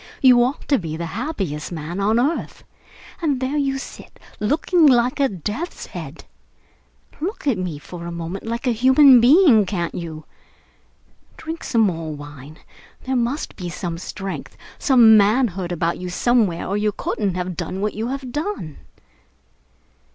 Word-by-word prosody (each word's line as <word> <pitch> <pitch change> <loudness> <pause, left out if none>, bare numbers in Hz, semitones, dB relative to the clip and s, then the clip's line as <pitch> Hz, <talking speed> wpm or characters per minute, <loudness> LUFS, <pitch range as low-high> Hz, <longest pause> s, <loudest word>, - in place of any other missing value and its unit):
You 250 -2 +6
ought 255 +4 -3
to 280 -4 +3
be 160 -3 -5
the 170 - -4
happiest 185 - -4
man 165 +2 -5
on 215 +4 +2
earth. 290 +7 -2 0.6
And 290 -6 0
there 260 +3 -2
you 275 -2 0
sit, 270 - -10 0.2
looking 310 - +3
like 250 +1 +3
a 275 -1 +3
death's 210 - -5
head! - - -9 0.9
Look 370 +5 -4
at 255 -9 +1
me 180 -5 -3
for 170 +3 -9
a - - -5
moment 170 +5 -6
like 235 +3 -3
a 250 - +2
human 260 +2 +6
being, 260 - +6
can't 180 -4 -3
you? 160 -3 -7 1.1
Drink 325 +1 -6
some 230 - +1
more 165 -6 0
wine. 145 +1 -11 0.5
There 260 0 -2
must 245 +5 -2
be 180 -2 -6
some 170 -1 -5
strength, 195 +1 -7 0.2
some 235 -5 +6
manhood 200 -4 +2
about 170 0 -1
you 180 0 -5
somewhere, 205 -3 +1
or 200 - -1
you 210 0 +1
couldn't 200 -2 -2
have 180 0 -3
done 185 - -4
what 210 +1 -1
you 220 +2 -3
have 265 -1 -5
done." 295 - -4
215 Hz, 160 wpm, -21 LUFS, 175-265 Hz, 1.1 s, You